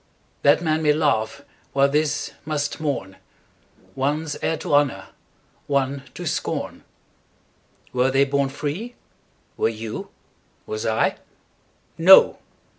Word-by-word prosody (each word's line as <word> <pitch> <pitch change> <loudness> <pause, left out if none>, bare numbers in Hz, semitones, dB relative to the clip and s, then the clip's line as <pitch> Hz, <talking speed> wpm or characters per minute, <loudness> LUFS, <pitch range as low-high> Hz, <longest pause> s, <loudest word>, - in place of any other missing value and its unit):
'That 145 +4 +4
man 160 -1 +1
may 150 -1 +4
laugh 140 -4 0 0.3
while 140 0 +4
this 150 +1 -1
must 145 -2 -2
mourn; 140 -11 -3 0.8
One's 150 +3 -1
heir 160 - 0
to 160 -1 -4
honour, 145 -2 +2 0.6
one 140 -1 0
to - - -6
scorn—Were 125 +1 -5
they 135 +1 +3
born 140 0 0
free? 155 - -5 0.6
Were - - +2
you? 110 -1 -6 0.6
Was 110 0 -4
I?No! 165 +9 +2
145 Hz, 105 wpm, -23 LUFS, 135-155 Hz, 0.8 s, That